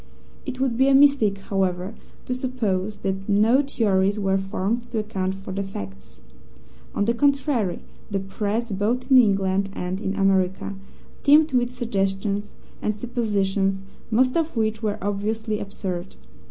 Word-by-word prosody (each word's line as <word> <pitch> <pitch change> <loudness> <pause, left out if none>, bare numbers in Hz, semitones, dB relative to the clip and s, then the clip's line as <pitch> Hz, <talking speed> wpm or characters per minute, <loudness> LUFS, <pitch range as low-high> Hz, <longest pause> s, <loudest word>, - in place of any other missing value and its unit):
It 260 -1 -4
would 260 -3 0
be 265 +1 +4
a 275 - +5
mistake, 270 -8 +5
however, 190 0 -1 0.3
to 250 - -2
suppose 215 -6 -2
that 195 +1 -3
no 220 +6 +4
theories 205 -7 +1
were 195 -2 +1
formed 215 +5 -2
to 235 - -3
account 190 -3 -2
for 195 0 -8
the 195 - -2
facts. 95 - -8 0.7
On 200 - +1
the 235 - +2
contrary, 275 - +1 0.3
the 200 -2 -1
Press, 210 +4 -2
both 225 +7 -1
in 260 - +9
England 195 -3 +2
and 185 +2 -4
in 195 -1 -2
America, 195 0 +1 0.5
teemed 300 +1 +5
with 245 -1 +2
suggestions 205 -4 -2 0.3
and 210 - 0
suppositions, 200 -4 0 0.3
most 255 +3 +3
of 325 -5 0
which 220 0 0
were 210 -2 -1
obviously 210 +2 -1
absurd. 190 -2 -5
205 Hz, 145 wpm, -24 LUFS, 195-240 Hz, 0.7 s, in